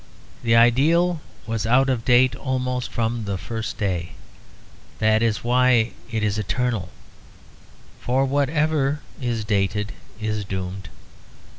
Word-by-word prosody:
The 115 -1 +3
ideal 155 +9 +4 0.2
was 115 0 -2
out 130 +3 +4
of 125 -4 0
date 125 0 +4
almost 125 -1 -2
from 115 -1 -1
the 100 -1 -2
first 110 +4 -5
day; 90 -5 -2 0.8
that 110 0 +3
is 115 -2 0
why 120 -1 +3 0.2
it 110 -2 -2
is 105 0 0
eternal; 110 -2 -1 1.1
for 130 +2 +1
whatever 145 +1 +1 0.2
is 115 -3 -2
dated 105 0 0 0.3
is 110 -1 -2
doomed. 95 0 -5
115 Hz, 120 wpm, -23 LUFS, 105-130 Hz, 1.1 s, ideal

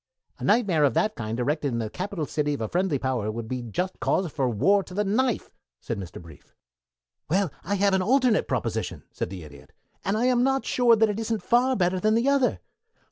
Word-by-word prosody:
"A - - -8
nightmare 200 -8 +3
of 140 - +3
that 215 0 +2
kind 115 0 -4
erected 145 +4 0
in - - -1
the 115 -2 -2
capital 180 - -4
city 150 0 -1
of 140 - -7
a 110 - -1
friendly 180 - 0
power 125 -5 -1
would 115 0 -6
be 125 +1 -3
just 180 - -3
cause 180 -4 0
for 135 -3 0
war 195 - +3
to 185 -1 -11
the 210 - +1
knife!" 230 +4 0 0.3
said 115 - -4
Mr. 90 -3 -8
Brief. 80 -4 -16 0.7
"Well, 185 -1 +1
I 200 +6 -1
have 200 0 +2
an 190 - +3
alternative 250 +1 +3
proposition," - - -2
said - - -4
the 90 -3 -8
Idiot, 70 -2 -14 0.3
"and 200 +2 0
I 235 - +1
am 250 -1 +3
not 270 0 +1
sure 240 -2 +4
that 220 0 +3
it 210 +1 -2
isn't 225 -1 -2
far 250 +2 +3
better 185 -2 +1
than 215 +3 +2
the 235 +4 +1
other. 280 -2 +2
185 Hz, 220 wpm, -26 LUFS, -, 0.7 s, sure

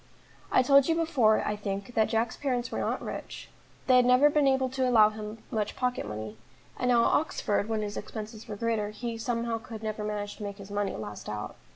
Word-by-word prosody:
I 255 - +5
told 275 +1 +6
you 330 - +2
before, 280 -10 +3
I 210 - 0
think, 200 +2 -5
that 220 -1 +2
Jack's 225 0 0
parents 250 -4 -2
were - - -2
not - - -1
rich; - - -7 0.4
they 255 -1 +6
had 250 - +5
never 255 +4 +6
been 295 -1 +3
able 265 -1 +3
to 260 0 0
allow 215 -3 +6
him 215 0 -7
much 215 -3 -1
pocket 250 - -1
money, 110 +1 -6 0.4
and 250 - +1
now 240 -1 +5
at - - +3
Oxford, 215 -8 0
when 220 -1 0
his 205 -1 -4
expenses 220 0 -7
were 210 - -5
greater, 220 -1 -1
he 230 +2 -5
somehow 230 -1 -1
could 220 -1 -9
never 215 -1 -3
manage 205 -1 -4
to 215 - -7
make 200 -1 -5
his 200 -1 -11
money 205 -1 -1
last 105 -1 -7
out. 105 0 -5
220 Hz, 220 wpm, -28 LUFS, 210-250 Hz, 0.4 s, told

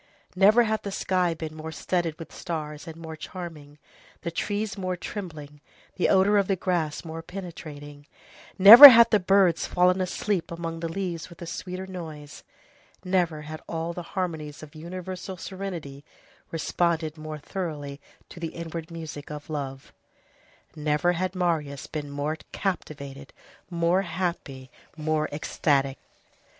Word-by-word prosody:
Never 210 +6 +6
had 220 -1 -1
the 200 - -5
sky 180 -3 0
been 160 -1 -6
more 160 0 -6
studded 165 0 -2
with 165 - -10
stars 150 -2 -5
and 160 - -7
more 160 -1 -8
charming, 155 -4 -9 0.5
the 170 - -3
trees 205 +4 -2
more 185 -2 -3
trembling, 155 -7 -7 0.3
the 180 - +1
odor 200 +2 +5
of 195 - 0
the 195 - +2
grass 170 -4 -2
more 165 0 -6
penetrating; 155 -5 -9 0.5
never 230 +9 +14
had 235 -2 +7
the 210 - +5
birds 185 -3 +3
fallen 180 +1 +3
asleep 185 0 -1
among 165 -1 -5
the 165 0 -3
leaves 175 -2 -4
with 170 - -14
a 170 - -7
sweeter 185 +2 -5
noise; 160 -6 -9 0.6
never 175 -5 0
had 155 +1 -8
all 165 +1 -3
the 175 - -5 0.2
harmonies 155 -5 -3
of 150 0 -12
universal 185 +3 -7
serenity 170 -8 -6 0.5
responded 165 -1 -1
more 155 -1 -7
thoroughly 145 -4 -5 0.3
to - - -12
the 165 -2 -5
inward 165 -1 -6
music 160 -3 -8
of 150 +1 -8
love; 135 -3 -5 0.8
never 150 +3 +1
had 185 +2 -2
Marius 160 -6 -1
been 150 -2 -5
more 145 +2 -2
captivated, 140 -7 -5 0.4
more 170 +1 +2
happy, 170 -8 -4 0.3
more 155 0 0
ecstatic. 140 -2 0
165 Hz, 140 wpm, -26 LUFS, 150-185 Hz, 0.8 s, never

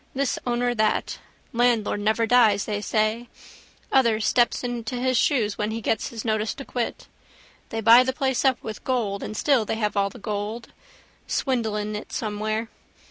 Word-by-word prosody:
This 275 -1 0
owner, 245 0 +1
that. 215 -2 0 0.3
Landlord 235 -3 +2
never 220 +2 +1
dies 225 -4 +4
they 205 -1 -3
say. 215 +3 0 0.6
Other 235 -5 +3
steps 240 +3 +2
into 240 -1 -4
his 255 +1 0
shoes 235 -6 +1
when 210 0 0
he 220 +1 -3
gets 220 0 -1
his 230 -1 -7
notice 220 -1 0
to 275 - -8
quit. 245 -2 -4 0.6
They 225 - -3
buy 230 +3 +8
the 260 - 0
place 265 -1 -1
up 265 -2 +2
with 215 -1 -7
gold 220 -6 -1
and 215 - -5
still 270 -3 +3
they 215 - -2
have 210 -2 -1
all 200 0 +2
the 245 - -13
gold. 215 +2 -4 0.6
Swindle 235 -6 -1
in 210 0 -3
it 210 - -7
somewhere. 215 +1 -2
225 Hz, 175 wpm, -24 LUFS, 215-245 Hz, 0.6 s, buy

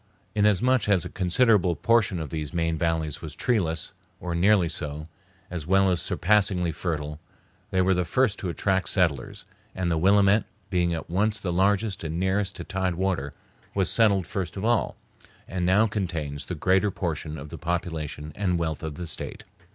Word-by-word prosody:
Inasmuch 105 +3 +3
as 95 -5 +3
a - - -5
considerable 95 -1 +3
portion 110 -1 +2
of 80 -3 -5
these 80 -1 -4
main 80 -1 +1
valleys 80 -2 -1
was 80 -2 -7
treeless, 90 -10 0 0.3
or 90 -1 -4
nearly 95 +1 +4
so, 75 -2 -4 0.5
as 85 -4 -5
well 95 +1 +4
as 85 -2 +1
surpassingly 95 -3 +2
fertile, 75 -2 -4 0.5
they 95 -2 +2
were 95 +1 +3
the 90 0 +1
first 110 +5 +1
to 95 - -3
attract 95 +2 0
settlers; 85 -7 0 0.3
and 90 -2 -1
the 80 - +1
Willamette, 100 +3 +4 0.3
being 90 -2 +2
at 80 -2 -4
once 105 +5 0
the 90 -3 -2
largest 100 +2 +1
and 80 +1 -3
nearest 95 +2 0
to - - -6
tide 95 -2 -1
water, 90 -7 -1 0.4
was 95 -2 +2
settled 100 -5 +3
first 95 0 -4
of 95 - -3
all, 120 -1 +1 0.5
and 90 -1 -2
now 100 +4 +5
contains 85 -9 -3
the 90 - -3
greater 95 +5 +2
portion 80 -4 -3
of 75 +1 -8
the - - -8
population 80 -3 -3
and 90 -1 0
wealth 80 -3 -2
of 80 -2 -5
the 90 - -5
State. 80 - -6
90 Hz, 175 wpm, -26 LUFS, 80-100 Hz, 0.5 s, now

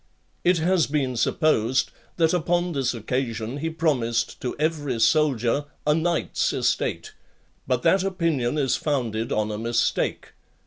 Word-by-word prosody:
It 180 0 +4
has 170 +1 +2
been 135 -4 -1
supposed, 130 -1 +1 0.3
that 165 -1 +3
upon 175 +1 +1
this 135 -5 -1
occasion 115 +1 -3
he 160 +3 -2
promised 125 -9 -1
to 125 - -3
every 145 -5 -1
soldier 140 0 +2 0.2
a 150 - +4
knight's 165 +2 0
estate; - - -1 0.5
but 125 -1 0
that 190 -1 +4
opinion 165 -9 0
is 135 -3 +1
founded 120 -6 -2
on 110 0 0
a 105 - -4
mistake. 115 +1 0
140 Hz, 135 wpm, -24 LUFS, 120-160 Hz, 0.5 s, It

